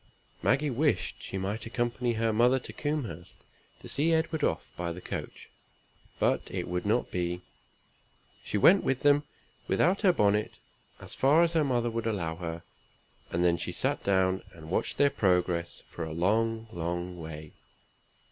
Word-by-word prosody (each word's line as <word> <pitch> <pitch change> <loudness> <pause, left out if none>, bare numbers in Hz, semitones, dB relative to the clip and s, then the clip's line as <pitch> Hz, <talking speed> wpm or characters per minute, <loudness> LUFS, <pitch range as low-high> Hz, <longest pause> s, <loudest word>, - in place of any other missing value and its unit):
Maggie 140 +2 +2
wished 145 +4 0
she 95 - -5
might 105 +4 -3
accompany 120 +1 -1
her 115 0 0
mother 120 +4 +4
to 130 - -6
Combehurst 130 - -4 0.4
to - - -10
see 155 +4 +1
Edward 160 -1 0
off 80 - 0
by 85 -1 -3
the 85 - -7
coach; - - -7 0.7
but - - +1
it - - -3
was 90 +2 -2
not 110 +4 +2
to - - -26
be. 90 0 -2 1.0
She - - -2
went 185 - +6
with 135 -1 0
them, 145 0 +5 0.5
without 185 +4 +2
her 195 -4 +6
bonnet, 105 -7 +1 0.4
as - - -9
far 150 +5 +4
as 170 0 +1
her 160 -2 +3
mother 120 -4 0
would 115 0 -2
allow 85 -7 -2
her; 85 -1 -5 0.7
and 85 +1 0
then 85 -1 +3
she - - -4
sat - - -1
down, 95 -1 +2
and 80 0 -11
watched - - 0
their 140 0 +4
progress 90 -7 0
for 85 - -5
a 80 -1 -5
long, 110 +6 +1
long 85 -1 -4
way. 80 -2 -8
110 Hz, 165 wpm, -29 LUFS, 90-135 Hz, 1.0 s, went